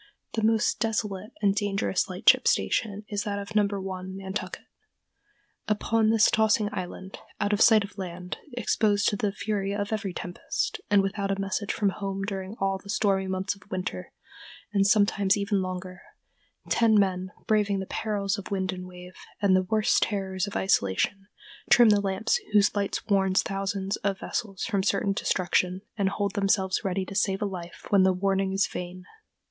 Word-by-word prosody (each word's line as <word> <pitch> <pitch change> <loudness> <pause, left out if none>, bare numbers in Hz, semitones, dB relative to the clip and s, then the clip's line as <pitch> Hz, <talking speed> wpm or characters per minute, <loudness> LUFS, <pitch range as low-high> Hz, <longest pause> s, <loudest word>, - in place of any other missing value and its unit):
The 225 - -1
most 220 0 +2
desolate 210 -3 -2
and 200 -1 +4
dangerous 200 -2 0
lightship 185 +3 +4
station 210 -2 0
is 205 -1 -1
that 200 -1 -3
of 200 +1 -6
No. 210 -1 +4
1, 190 -1 -5
Nantucket. 195 +1 -5 1.0
"Upon 220 +1 +1
this 225 -1 +4
tossing 220 -1 +3
island, 185 0 -6 0.2
out 205 0 +1
of 205 - +1
sight 220 -3 +7
of 200 0 -10
land, 180 -1 -6 0.2
exposed 210 -3 +2
to - - -2
the 205 0 -1
fury 200 -1 -2
of 205 +1 -2
every 210 -3 -2
tempest, 175 0 -3
and 205 -1 +5
without 195 0 -2
a 195 0 -1
message 195 +1 -2
from 205 -2 +1
home 195 0 -4
during 195 0 -4
all 195 0 0
the 200 - -15
stormy 195 -2 +1
months 190 +1 -1
of 200 0 -20
winter, 180 - -4 0.6
and 195 -1 +3
sometimes 205 -1 +3
even 200 -1 0
longer, 185 0 -5 0.7
ten 220 -2 +4
men, 185 -1 0 0.2
braving 210 -2 +2
the 190 - -3
perils 200 -1 -2
of 195 - -8
wind 190 -1 -1
and 180 0 -7
wave, 180 0 -12 0.2
and 200 -2 +4
the 185 0 +1
worse 215 -1 +3
terrors 195 -2 -1
of 200 - -7
isolation, 190 - +1 0.4
trim 240 -2 +7
the 205 -1 +4
lamps 195 +2 0 0.2
whose 210 0 +4
light 200 -1 0
warns 190 -2 +3
thousands 195 0 -2
of 195 -1 -1
vessels 195 -3 -4
from 200 -4 0
certain 195 0 +1
destruction, 185 0 0
and 200 -3 +1
hold 200 0 -2
themselves 195 -2 +1
ready 190 0 -1
to 195 - -8
save 195 0 +1
life 175 -5 -6
when 200 -2 +6
the 190 0 +5
warning 195 +1 0
is 195 +1 +2
vain." 180 +1 -7
195 Hz, 175 wpm, -27 LUFS, 190-205 Hz, 1.0 s, sight